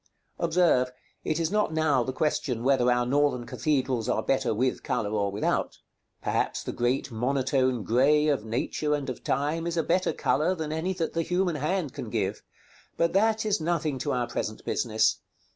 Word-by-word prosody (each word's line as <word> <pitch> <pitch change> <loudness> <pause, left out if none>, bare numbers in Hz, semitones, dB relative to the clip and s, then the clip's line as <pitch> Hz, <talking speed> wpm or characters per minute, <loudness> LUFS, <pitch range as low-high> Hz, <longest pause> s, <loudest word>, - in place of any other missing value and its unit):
Observe, 165 -7 +3 0.3
it 155 +1 -1
is 165 +1 0
not 210 -4 +1
now 155 -4 +2
the 130 - -2
question 130 -4 -1
whether 130 -2 +3
our 125 0 +2
Northern 140 -2 +1
cathedrals 130 -2 -1
are - - +1
better 135 -1 +1
with 125 +4 0
color 105 -1 -2
or 100 -2 0
without. 100 +2 -1 0.5
Perhaps - - -1
the - - -4
great 125 +2 -1
monotone 130 0 0
grey 145 +7 +3
of 140 -7 +1
Nature 135 +6 -1
and 140 -2 -3
of 125 - -9
Time 155 +4 -1
is 170 0 -2
a 165 - +2
better 185 +3 +1
color 160 +6 +1
than 160 -3 -4
any 160 +4 -1
that 170 -3 -3
the 165 - 0
human 180 -1 0
hand 155 0 -1
can - - -6
give; - - -2 0.6
but 170 - +2
that 220 +3 +2
is 210 -3 +1
nothing 155 -4 -1
to - - -2
our 125 -1 0
present 110 -2 -4
business. 110 -3 +1
140 Hz, 180 wpm, -27 LUFS, 125-165 Hz, 0.6 s, Observe